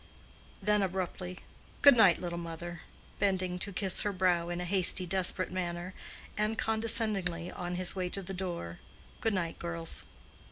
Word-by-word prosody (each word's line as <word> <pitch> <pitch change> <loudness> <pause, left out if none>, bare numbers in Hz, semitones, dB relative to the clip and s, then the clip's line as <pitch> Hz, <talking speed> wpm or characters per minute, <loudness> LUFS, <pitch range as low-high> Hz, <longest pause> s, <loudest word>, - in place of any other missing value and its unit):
Then 210 +1 +3
abruptly, 185 -1 -3 0.5
"Good 285 -2 +9
night, 200 -7 +6
little 170 -1 -4
mother," 170 0 -7 0.4
bending 185 -2 0
to 200 - -2
kiss 190 -1 0
her 205 - 0
brow 180 -3 +1
in 175 0 -3
a 180 - -3
hasty, 185 0 +4
desperate 185 0 -1
manner, 175 0 -4 0.4
and 215 +1 0
condescendingly, 215 -6 +1
on 180 -1 -4
his 185 +1 +2
way 180 -1 -2
to 195 +2 +2
the 195 +2 -6
door, 175 - -5 0.4
"Good 225 -2 0
night, 170 -3 -3
girls." 170 -1 0
185 Hz, 155 wpm, -31 LUFS, 175-195 Hz, 0.5 s, Good